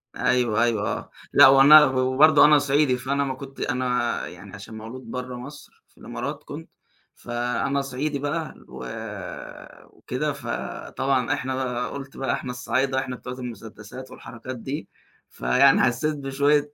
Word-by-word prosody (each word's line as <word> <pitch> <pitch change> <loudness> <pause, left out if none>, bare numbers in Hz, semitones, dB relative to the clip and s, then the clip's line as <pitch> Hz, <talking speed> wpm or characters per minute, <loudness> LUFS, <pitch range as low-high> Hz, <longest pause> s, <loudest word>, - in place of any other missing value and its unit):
أيوه 120 -3 +2
أيوه 115 -3 +1
آه، - - -4 0.2
لأ 145 - +9
وأنا 140 +3 +9
وبرضه 130 +3 +5
أنا 150 0 +7
صعيدي 140 -2 +2
فأنا 140 +3 -1
ما 135 -1 -2
كنت 135 0 -11
أنا 125 -1 -1
يعني 100 -1 -12
عشان 100 +2 -10
مولود 115 +4 -9
بره 125 0 -5
مصر 140 +4 -11
في - - -33
الإمارات، - - -6
كنت - - -9 0.5
فأنا 120 +3 -2
صعيدي 140 +2 -3
بقى 150 +2 -3
و 65 0 -9 1.1
وكده، 145 +4 -3
فطبعًا 135 -1 -2
إحنا 130 -2 -3
بقى 125 -2 -2
قُلت 135 -1 -8
بقى 135 - -1
إحنا 125 - -4
الصعايدة 130 +2 0
إحنا 130 -1 -4
بتوع 125 0 -8
المسدسات 120 0 -9
والحركات 130 +2 -9
دي، 135 +6 -5 0.4
فيعني 135 +2 +4
حسّيت 130 +5 +1
بشوية 145 +1 +1
130 Hz, 145 wpm, -24 LUFS, 125-140 Hz, 1.1 s, لأ